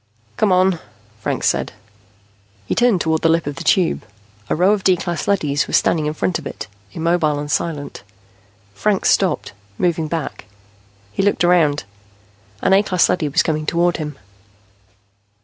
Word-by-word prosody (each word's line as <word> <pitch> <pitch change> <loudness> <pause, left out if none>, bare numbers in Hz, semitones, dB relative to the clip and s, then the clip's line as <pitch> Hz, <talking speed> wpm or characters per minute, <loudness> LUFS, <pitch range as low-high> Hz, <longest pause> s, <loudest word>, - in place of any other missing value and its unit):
"Come 215 -3 +2
on," 185 -1 +3 0.4
Franks - - -1
said. - - 0 0.9
He - - -1
turned 240 -7 +3
toward 160 -1 0
the 165 - +3
lip 165 0 +2
of 145 -1 -5
the 170 - -5
Tube. 175 +1 +2 0.5
A - - +1
row 180 +5 +4
of 210 -2 0
D 185 -2 +4
class 170 -1 -4
leadys 150 -8 +1
was - - +3
standing 155 -2 +1
in 150 - -3
front 95 -9 -1
of - - -7
it, - - -7 0.3
immobile 165 - +1
and 145 0 -4
silent. 150 -2 -3 0.7
Franks 205 - +1
stopped, 190 - 0 0.2
moving 165 -3 0
back. 160 -1 -4 0.7
He - - -1
looked 200 -2 +1
around. 165 -5 +3 0.8
An - - +4
A 195 - +6
class 185 -4 +2
leady 155 -4 0
was 140 - +2
coming 155 -1 -2
toward 175 0 +1
him. 150 -3 -5
170 Hz, 165 wpm, -19 LUFS, 150-185 Hz, 0.9 s, A